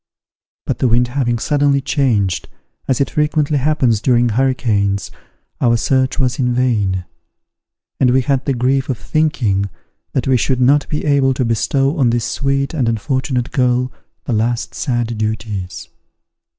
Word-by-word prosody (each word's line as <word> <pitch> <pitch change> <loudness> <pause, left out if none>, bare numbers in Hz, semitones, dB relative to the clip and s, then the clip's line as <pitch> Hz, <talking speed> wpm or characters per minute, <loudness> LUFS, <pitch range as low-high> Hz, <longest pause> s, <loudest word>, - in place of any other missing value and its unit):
But - - -2
the 130 - +2
wind 120 +1 +2
having 120 -2 0
suddenly 145 +2 +2
changed, 120 - 0 0.4
as 130 - +1
it 140 - 0
frequently 150 -1 +1
happens 130 -6 +1
during 120 -1 +3
hurricanes, 105 -6 0 0.5
our 120 -1 +3
search 130 +2 +1
was 130 -2 0
in 125 -2 +1
vain; 105 -8 0 0.9
and 130 - +4
we 130 +2 +3
had 135 0 0
the 140 - 0
grief 130 +3 0
of 130 - -1
thinking 110 -12 0 0.4
that 130 - -1
we 130 -1 +4
should 130 +2 0
not 140 +3 +3
be 150 - -3
able 140 -3 +2
to 130 - 0
bestow 135 +6 0
on 125 -3 +4
this 115 0 0
sweet 140 +1 -1
and 130 -7 0
unfortunate 125 +2 -1
girl 125 -1 +1 0.3
the 125 - -2
last 115 +2 -1
sad 120 -5 -2
duties. 110 -4 -4
125 Hz, 150 wpm, -17 LUFS, 115-135 Hz, 0.9 s, and